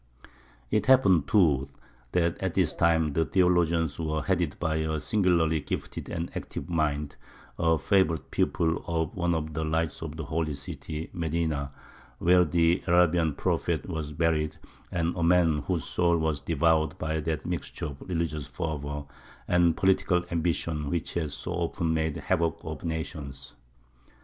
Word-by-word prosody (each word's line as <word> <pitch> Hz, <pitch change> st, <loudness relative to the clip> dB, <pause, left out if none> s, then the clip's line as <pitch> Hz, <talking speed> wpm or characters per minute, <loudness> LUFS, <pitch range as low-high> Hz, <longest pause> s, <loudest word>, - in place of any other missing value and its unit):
It 110 Hz, +3 st, +1 dB
happened, 95 Hz, -, +5 dB
too, 75 Hz, -9 st, +3 dB, 0.4 s
that 85 Hz, -1 st, +1 dB
at 95 Hz, -3 st, -2 dB
this 90 Hz, -5 st, +2 dB
time 80 Hz, -3 st, +2 dB
the 80 Hz, -, +2 dB
theologians 85 Hz, -4 st, +2 dB
were 80 Hz, -2 st, -1 dB
headed 90 Hz, -4 st, 0 dB
by 80 Hz, -2 st, 0 dB
a 80 Hz, 0 st, -1 dB
singularly 85 Hz, -6 st, +2 dB
gifted -, -, -5 dB
and 85 Hz, 0 st, -4 dB
active -, -, -5 dB
mind, 75 Hz, -4 st, -1 dB, 0.4 s
a 80 Hz, -1 st, +3 dB
favourite 80 Hz, -3 st, +1 dB
pupil 85 Hz, -2 st, 0 dB
of 80 Hz, -2 st, -1 dB
one 85 Hz, -2 st, +1 dB
of 80 Hz, -1 st, -3 dB
the 80 Hz, +1 st, -2 dB
lights 80 Hz, 0 st, -1 dB
of 80 Hz, -1 st, -6 dB
the 80 Hz, -, -4 dB
Holy 75 Hz, +1 st, -1 dB
City 75 Hz, +3 st, -7 dB
Medina, 80 Hz, -4 st, -1 dB, 0.5 s
where 90 Hz, +1 st, +5 dB
the 85 Hz, +2 st, +2 dB
Arabian 85 Hz, -3 st, +3 dB
Prophet -, -, -1 dB
was 80 Hz, -2 st, -4 dB
buried, 75 Hz, 0 st, 0 dB, 0.3 s
and 85 Hz, 0 st, 0 dB
a 85 Hz, -, -3 dB
man 85 Hz, -2 st, +4 dB
whose 80 Hz, +3 st, -2 dB
soul 85 Hz, -1 st, +1 dB
was 80 Hz, -3 st, 0 dB
devoured 80 Hz, +1 st, +2 dB
by 80 Hz, 0 st, -2 dB
that 80 Hz, 0 st, -3 dB
mixture 85 Hz, -2 st, -4 dB
of 70 Hz, -3 st, -7 dB
religious 80 Hz, -5 st, -2 dB
fervour 75 Hz, -1 st, -4 dB, 0.4 s
and 85 Hz, -2 st, +3 dB
political 95 Hz, -2 st, +2 dB
ambition 80 Hz, -3 st, -1 dB
which 85 Hz, 0 st, -2 dB
has 80 Hz, -4 st, -2 dB
so -, -, -5 dB
often 80 Hz, -1 st, -1 dB
made 80 Hz, -1 st, 0 dB
havoc 85 Hz, -4 st, 0 dB
of -, -, -6 dB
nations. 75 Hz, -5 st, -5 dB
80 Hz, 150 wpm, -28 LUFS, 75-85 Hz, 0.5 s, happened